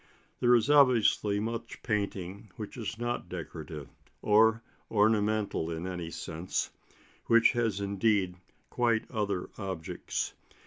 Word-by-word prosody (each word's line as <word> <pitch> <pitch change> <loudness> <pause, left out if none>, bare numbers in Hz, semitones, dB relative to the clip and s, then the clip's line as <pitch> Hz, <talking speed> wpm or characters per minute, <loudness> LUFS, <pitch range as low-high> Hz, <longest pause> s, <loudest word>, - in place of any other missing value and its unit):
There 120 0 +5
is 115 -1 +3
obviously 125 -7 +4
much 115 +1 -5
painting 100 -2 -3
which 105 -2 -7
is 115 -1 -5
not 120 +1 -3
decorative, 80 -3 -7 0.4
or 110 +2 +5 0.3
ornamental 105 -4 +2
in 80 +1 -4
any 90 -3 -4
sense, 85 +2 -3 0.6
which 115 0 +6
has 115 -5 0
indeed 100 -2 +1 0.4
quite 115 -2 +2
other 100 -5 -2
objects. 95 -5 -3
105 Hz, 115 wpm, -30 LUFS, 95-115 Hz, 0.6 s, which